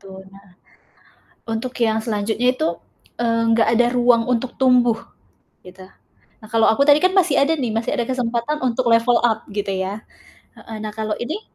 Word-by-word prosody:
Tuh, 190 Hz, -1 st, -12 dB
nah. 195 Hz, +1 st, -18 dB, 1.0 s
Untuk 225 Hz, +3 st, -4 dB
yang 220 Hz, -1 st, +2 dB
selanjutnya 220 Hz, +3 st, -1 dB
itu, 315 Hz, +5 st, -1 dB, 0.5 s
eee, 230 Hz, -1 st, 0 dB
enggak 225 Hz, 0 st, +3 dB
ada 240 Hz, +1 st, +3 dB
ruang 245 Hz, -1 st, +3 dB
untuk 245 Hz, 0 st, -1 dB
tumbuh, 245 Hz, -3 st, +3 dB, 0.6 s
gitu. 185 Hz, +1 st, -14 dB, 0.6 s
A -, -, -11 dB
kalau 225 Hz, 0 st, +3 dB
aku 220 Hz, +5 st, +3 dB
tadi 290 Hz, +1 st, +5 dB
kan 370 Hz, +4 st, +1 dB
masih 360 Hz, -7 st, +3 dB
ada 295 Hz, +4 st, +2 dB
nih, 260 Hz, -7 st, -3 dB
masih 225 Hz, +1 st, -2 dB
ada -, -, -1 dB
kesempatan 245 Hz, +3 st, -2 dB
untuk 245 Hz, 0 st, 0 dB
level 230 Hz, +1 st, +3 dB
up 230 Hz, -2 st, 0 dB
gitu 200 Hz, 0 st, -3 dB
ya. 190 Hz, +2 st, -4 dB, 0.5 s
Heeh, 220 Hz, -, -10 dB
nah 215 Hz, -, -5 dB
kalau 215 Hz, -1 st, -4 dB
ini, 315 Hz, -, -5 dB
230 Hz, 170 wpm, -20 LUFS, 220-250 Hz, 1.0 s, tadi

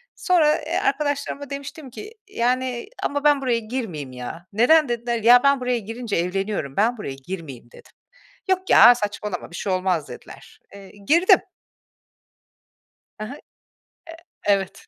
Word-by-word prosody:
Sonra, 320 Hz, -5 st, +3 dB
eee, -, -, -3 dB
arkadaşlarıma 285 Hz, -1 st, -2 dB
demiştim 280 Hz, 0 st, -8 dB
ki, 420 Hz, -, -10 dB, 0.2 s
"Yani, 255 Hz, -, -1 dB
ama 285 Hz, 0 st, -2 dB
ben 290 Hz, -2 st, +4 dB
buraya 245 Hz, -3 st, 0 dB
girmeyeyim 215 Hz, -, -5 dB
ya." 125 Hz, +7 st, -8 dB
"Neden?" 285 Hz, +7 st, +4 dB
dediler. 235 Hz, -1 st, -2 dB
"Ya, 245 Hz, +2 st, +7 dB
ben 280 Hz, -1 st, +4 dB
buraya 250 Hz, -1 st, -1 dB
girince 225 Hz, +1 st, -5 dB
evleniyorum, 180 Hz, -4 st, -2 dB
ben 235 Hz, +4 st, +1 dB
buraya 140 Hz, -10 st, -6 dB
girmeyeyim." 145 Hz, -10 st, -8 dB
dedim. -, -, -17 dB, 0.6 s
"Yok 375 Hz, 0 st, 0 dB
ya, 245 Hz, -, +8 dB
saçmalama 210 Hz, -4 st, -5 dB
bir -, -, -9 dB
şey 190 Hz, +2 st, -2 dB
olmaz." 185 Hz, -4 st, -1 dB
dediler. -, -, -13 dB, 0.2 s
Eee, 195 Hz, -1 st, -13 dB, 0.2 s
girdim. 340 Hz, +4 st, +5 dB, 1.8 s
Ha 215 Hz, -, -5 dB
ha. -, -, -7 dB, 1.1 s
Eee 205 Hz, -, +6 dB
Evet. 195 Hz, 0 st, -7 dB
235 Hz, 140 wpm, -22 LUFS, 195-280 Hz, 1.8 s, ya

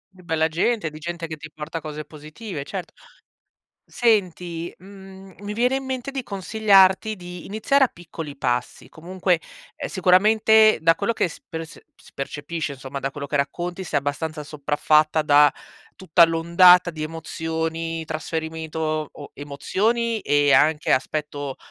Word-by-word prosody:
E 185 Hz, -, -16 dB
bella 160 Hz, -2 st, 0 dB
gente, 170 Hz, +2 st, 0 dB
di 155 Hz, -, -10 dB
gente 170 Hz, +1 st, -5 dB
che 160 Hz, -1 st, -7 dB
ti 155 Hz, +1 st, -10 dB
porta 155 Hz, +1 st, -6 dB
cose 155 Hz, -1 st, -7 dB
positive, 155 Hz, +2 st, -8 dB
certo. 185 Hz, -1 st, -6 dB, 0.9 s
Senti, 180 Hz, -7 st, 0 dB
mhmm, 190 Hz, 0 st, -14 dB
mi 205 Hz, 0 st, -5 dB
viene 250 Hz, +4 st, +2 dB
in 270 Hz, -, -4 dB
mente 260 Hz, 0 st, -4 dB
di 270 Hz, -1 st, -4 dB
consigliarti 200 Hz, 0 st, +3 dB
di 180 Hz, -1 st, -9 dB
iniziare 225 Hz, +7 st, +2 dB
a -, -, 0 dB
piccoli 165 Hz, -5 st, -9 dB
passi. 125 Hz, -2 st, -2 dB
Comunque, 180 Hz, +1 st, -1 dB, 0.4 s
ehm, -, -, -5 dB
sicuramente 215 Hz, +4 st, +5 dB
da 165 Hz, 0 st, +5 dB
quello 230 Hz, +7 st, -1 dB
che -, -, +1 dB
sp -, -, -16 dB
rs 165 Hz, 0 st, -7 dB, 0.2 s
si -, -, -19 dB
percepisce 145 Hz, +2 st, -4 dB
insomma, 135 Hz, 0 st, -7 dB
da 135 Hz, -, -2 dB
quello 140 Hz, +1 st, -6 dB
che 145 Hz, -, -2 dB
racconti, 175 Hz, +6 st, -2 dB
sei 155 Hz, -5 st, 0 dB
abbastanza 150 Hz, +2 st, -4 dB
sopraffatta 150 Hz, +2 st, +1 dB
da 145 Hz, 0 st, +6 dB, 0.5 s
tutta 170 Hz, -2 st, +5 dB
l'ondata 175 Hz, +2 st, +5 dB
di 155 Hz, -2 st, -7 dB
emozioni, 160 Hz, +1 st, -4 dB
trasferimento 160 Hz, 0 st, -5 dB
o 155 Hz, -1 st, -1 dB
o 145 Hz, -, -11 dB
emozioni 215 Hz, +11 st, -1 dB
e 145 Hz, -1 st, +3 dB
anche 155 Hz, +1 st, +3 dB
aspetto, 145 Hz, 0 st, -2 dB
165 Hz, 150 wpm, -23 LUFS, 155-190 Hz, 0.9 s, da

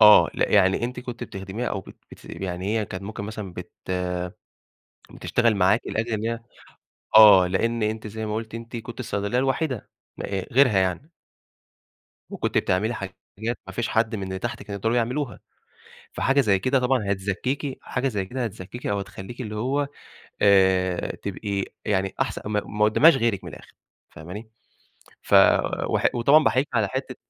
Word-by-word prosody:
آه. 105 Hz, -1 st, +8 dB
لأ، -, -, +1 dB
يعني 95 Hz, +5 st, +4 dB
أنتِ 125 Hz, +1 st, -4 dB
كنتِ 125 Hz, -1 st, -6 dB
بتخدميها 95 Hz, +3 st, -5 dB
أو 95 Hz, -, -3 dB
بت -, -, -14 dB, 0.2 s
بتث -, -, -14 dB
يعني 90 Hz, -1 st, -5 dB
هي 110 Hz, -, 0 dB
كانت 95 Hz, +1 st, -7 dB
ممكن 105 Hz, 0 st, -6 dB
مثلًا 105 Hz, -3 st, -6 dB
بت -, -, -8 dB, 1.4 s
بتشتغل 115 Hz, -2 st, +1 dB
معاكِ 100 Hz, +4 st, +3 dB
لأجل 115 Hz, +2 st, -2 dB
إن 110 Hz, 0 st, -2 dB
هي 115 Hz, 0 st, -2 dB, 0.8 s
آه. 100 Hz, -4 st, +9 dB
لإن 115 Hz, +5 st, 0 dB
أنتِ 110 Hz, 0 st, -2 dB
زي 110 Hz, +1 st, -5 dB
ما 105 Hz, 0 st, -2 dB
قُلتِ 110 Hz, 0 st, -5 dB
أنتِ 115 Hz, +1 st, -8 dB
كنتِ 115 Hz, +2 st, -8 dB
الصيدلية 105 Hz, -1 st, -2 dB
الوحيدة 135 Hz, -1 st, -1 dB, 0.3 s
م -, -, -6 dB
آآ 95 Hz, -2 st, -3 dB
غيرها 125 Hz, -5 st, +5 dB
يعني. 95 Hz, -, -1 dB, 1.2 s
وكنتِ -, -, -1 dB
بتعملي 105 Hz, +6 st, 0 dB
حاجات 95 Hz, -3 st, -7 dB, 0.5 s
ما -, -, -8 dB
فيش 120 Hz, 0 st, -2 dB
حد 110 Hz, 0 st, +1 dB
من 100 Hz, -, -5 dB
اللي 95 Hz, 0 st, -4 dB
تحت 120 Hz, +5 st, -4 dB
كانوا 100 Hz, -2 st, -6 dB
يقدروا 115 Hz, +4 st, 0 dB
يعملوها، 120 Hz, -1 st, -1 dB, 0.7 s
فحاجة 135 Hz, +2 st, +2 dB
زي 100 Hz, -6 st, +3 dB
كده 130 Hz, +8 st, +2 dB
طبعًا 125 Hz, -5 st, +1 dB
هتزكّيكِ 125 Hz, +8 st, -3 dB
حاجة 135 Hz, +2 st, -1 dB
زي 100 Hz, -6 st, -2 dB
كده 125 Hz, +5 st, -3 dB
هتزكّيكِ 110 Hz, +2 st, -7 dB
أو 100 Hz, -, 0 dB
هتخلّيكِ 100 Hz, +4 st, -8 dB
اللي 105 Hz, -3 st, -5 dB
هو 140 Hz, +5 st, 0 dB, 0.5 s
آآ 95 Hz, -2 st, +3 dB
تبقي 100 Hz, -1 st, -3 dB, 0.2 s
يعني 95 Hz, -1 st, 0 dB
أحسن -, -, -1 dB
ما 105 Hz, 0 st, 0 dB
ق -, -, -14 dB
ما 105 Hz, +1 st, 0 dB
قُدّامهاش 140 Hz, +9 st, +6 dB
غيرك 115 Hz, -6 st, 0 dB
من -, -, -7 dB
الآخِر -, -, -13 dB, 0.4 s
فاهماني؟ 95 Hz, +8 st, -9 dB, 0.7 s
ف -, -, 0 dB, 0.5 s
وح -, -, +2 dB
وطبعًا 140 Hz, +6 st, +5 dB
بأحييكِ 135 Hz, +2 st, +2 dB
على 110 Hz, -4 st, +2 dB
حتّة 130 Hz, -1 st, -4 dB
110 Hz, 170 wpm, -24 LUFS, 100-120 Hz, 1.4 s, آه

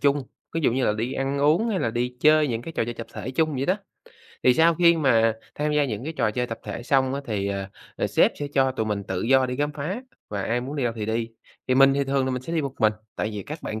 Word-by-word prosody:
chung, 145 Hz, 0 st, +2 dB, 0.3 s
ví 165 Hz, -, 0 dB
dụ 140 Hz, -, +2 dB
như 130 Hz, +1 st, +1 dB
là 105 Hz, -, +3 dB
đi 115 Hz, +5 st, -2 dB
ăn 135 Hz, +1 st, -1 dB
uống 155 Hz, +11 st, +3 dB
hay 200 Hz, -4 st, 0 dB
là 115 Hz, -, 0 dB
đi 125 Hz, +2 st, -2 dB
chơi 155 Hz, -1 st, +5 dB
những 115 Hz, -1 st, -2 dB
cái 165 Hz, -, -7 dB
trò 115 Hz, -, 0 dB
chơi 120 Hz, -, -5 dB
tập 115 Hz, -, -7 dB
thể 110 Hz, +3 st, -5 dB
chung 155 Hz, +2 st, +1 dB
vậy 135 Hz, +1 st, -1 dB
đó. 185 Hz, -, +3 dB, 0.7 s
Thì 125 Hz, -1 st, +5 dB
sau 165 Hz, +3 st, +5 dB
khi 170 Hz, 0 st, +5 dB
mà 115 Hz, -7 st, +3 dB, 0.2 s
tham 150 Hz, +1 st, -1 dB
gia 150 Hz, -1 st, +3 dB
những 115 Hz, -1 st, -4 dB
cái 160 Hz, -, -4 dB
trò 110 Hz, -8 st, +1 dB
chơi 125 Hz, +3 st, -1 dB
tập 115 Hz, -1 st, -6 dB
thể -, -, -6 dB
xong 130 Hz, +1 st, +2 dB
á, 140 Hz, -, -3 dB
thì, 100 Hz, -2 st, -1 dB
ờ, 100 Hz, -1 st, -3 dB, 0.3 s
ờ, -, -, 0 dB
sếp -, -, +3 dB
sẽ 145 Hz, -, -1 dB
cho 130 Hz, -1 st, +3 dB
tụi 110 Hz, -4 st, -2 dB
mình 105 Hz, -2 st, -1 dB
tự 95 Hz, -1 st, -3 dB
do 130 Hz, +2 st, +4 dB
đi 125 Hz, 0 st, -4 dB
khám 145 Hz, +1 st, -1 dB
phá, 165 Hz, -, -4 dB, 0.3 s
và 100 Hz, -2 st, -3 dB
ai 120 Hz, +4 st, 0 dB
muốn 135 Hz, +4 st, -5 dB
đi 135 Hz, -, 0 dB
đâu 115 Hz, -, 0 dB
thì 105 Hz, -1 st, -3 dB
đi, 115 Hz, +1 st, -1 dB, 0.4 s
thì 130 Hz, -, +3 dB
mình 135 Hz, +1 st, +6 dB
thì 140 Hz, 0 st, +1 dB
thường 135 Hz, 0 st, +1 dB
là 130 Hz, -, -1 dB
mình 125 Hz, 0 st, -3 dB
sẽ 165 Hz, -, -6 dB
đi 165 Hz, -, +1 dB
một 135 Hz, -1 st, -4 dB
mình, 110 Hz, -1 st, +4 dB, 0.2 s
tại 105 Hz, -, -1 dB
vì 105 Hz, -2 st, -5 dB
các 150 Hz, +2 st, -8 dB
bạn 110 Hz, -, -4 dB
130 Hz, 300 wpm, -25 LUFS, 115-145 Hz, 0.7 s, mình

